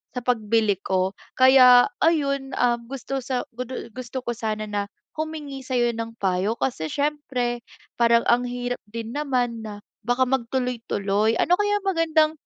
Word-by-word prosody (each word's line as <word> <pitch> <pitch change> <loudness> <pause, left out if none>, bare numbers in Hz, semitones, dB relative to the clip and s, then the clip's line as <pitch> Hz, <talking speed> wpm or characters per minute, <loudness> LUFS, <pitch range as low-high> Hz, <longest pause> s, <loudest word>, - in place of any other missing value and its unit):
sa - - -1
pagbili 220 -3 +2
ko. 190 +1 0 0.2
Kaya 255 -1 +8 0.2
ayun, 275 -4 +1
um, 240 -1 +3
gusto 270 +1 -4
sa 255 -1 -2
gu 250 - -3
du 260 - -6 0.2
gusto 255 +1 -5
ko 240 - -2
sana 215 -1 -3
na 205 -1 -2 0.3
humingi 305 -3 -5
sayo 245 -2 +1
ng 230 0 -5
payo, 195 +3 0
kasi 160 -12 -1
siyempre 270 -5 -1 0.4
parang 235 0 +4
ang 245 +1 +4
hirap 245 0 -3
din 230 0 -5
naman 245 -6 -1
na 205 -1 -7 0.2
baka 245 +3 +2
magtuloy-tuloy. 230 -4 0
Ano 355 - +4
kayang 415 -1 +1
magandang 320 -3 +3
245 Hz, 150 wpm, -24 LUFS, 225-270 Hz, 0.4 s, Kaya